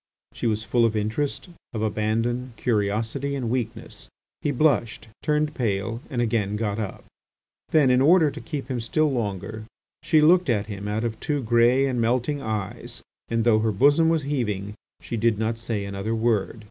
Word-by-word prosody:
She - - -2
was 110 -1 0
full 120 +1 +2
of 115 -1 +2
interest, 110 - -2 0.2
of 110 -1 -2
abandon, 115 +4 -1
curiosity, 115 +5 -1
and 125 -4 -2
weakness. 120 -3 -4 0.3
He - - 0
blushed, 120 -6 +1
turned 150 0 0
pale, 115 -1 -2
and 120 -4 0
again 105 -3 0
got 105 -1 -2
up. 105 -3 -5 0.6
Then, 145 -5 +4
in 125 +1 +4
order 160 +1 +5
to - - -8
keep 145 -4 -5
him 125 -3 -2
still 150 +6 +1
longer, 110 -2 -3 0.4
she 155 0 +3
looked 175 +1 +5
at 105 -3 +1
him 100 -1 -6
out 105 +2 -1
of 115 -2 -3
two 145 -3 -2
grey 120 +3 +4
and 125 -3 0
melting 125 +5 0
eyes, 110 +2 -5 0.3
and 115 -1 +1
though 110 -2 +4
her 110 0 +1
bosom 145 +9 +4
was 165 -2 +1
heaving, 105 -8 -2 0.3
she 115 - -4
did 115 -1 +2
not 110 +1 -1
say 110 -3 -3
another 100 +3 -3
word. 110 -1 0
115 Hz, 175 wpm, -24 LUFS, 110-135 Hz, 0.6 s, order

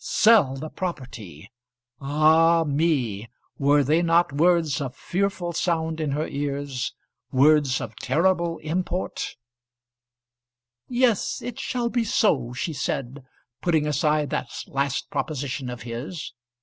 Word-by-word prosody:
Sell 215 - +4
the 155 +4 -6
property! 120 - -6 0.5
Ah, 160 +4 +4
me! 140 -8 0 0.3
Were 145 +1 +4
they 155 +5 +2
not 170 -3 +3
words 165 -2 +2
of 130 -2 -4
fearful 185 -2 -2
sound 160 -1 -1
in 155 - -1
her 150 +2 -1
ears, 140 -2 -3 0.4
words 140 -1 +4
of 110 -1 -6
terrible 170 +4 +1
import? 180 +3 -3 1.5
"Yes, 245 -4 +1
it 245 -2 -6
shall 240 -2 -1
be 240 -1 +1
so," 150 - +1
she 145 +6 -3
said, 135 -1 -3 0.4
putting 160 -4 +2
aside 150 0 +1
that - - -2 0.2
last 140 0 -2
proposition 135 -3 -3
of 125 -2 -7
his. 125 +8 -6
150 Hz, 120 wpm, -24 LUFS, 135-170 Hz, 1.5 s, Sell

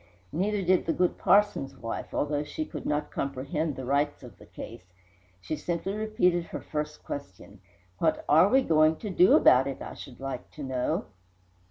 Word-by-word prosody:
Neither 200 +3 0
did 185 0 +2
the 165 - +2
good 180 -1 0
parson's 185 -9 +3
wife, 115 -2 -5
although 145 0 -1
she 310 - -4
could - - -7
not 150 0 -1
comprehend 140 +3 -2
the 130 - -6
rights 140 +2 0
of 120 -7 -13
the - - -15
case. 90 - -10 0.5
She 95 - -4
simply 170 +5 -3
repeated 210 -5 +1
her - - -6
first 150 0 -5
question: 100 -6 -8 0.4
"What 160 -1 +1
are 160 +6 +6
we 265 +3 +4
going 155 -3 +4
to 210 +4 -6
do 180 0 +5
about 130 +2 +6
it, 135 - -4
I - - -7
should 125 - -11
like 135 -2 -5
to 150 - -8
know?" 130 -2 -1
150 Hz, 180 wpm, -28 LUFS, 135-180 Hz, 0.5 s, are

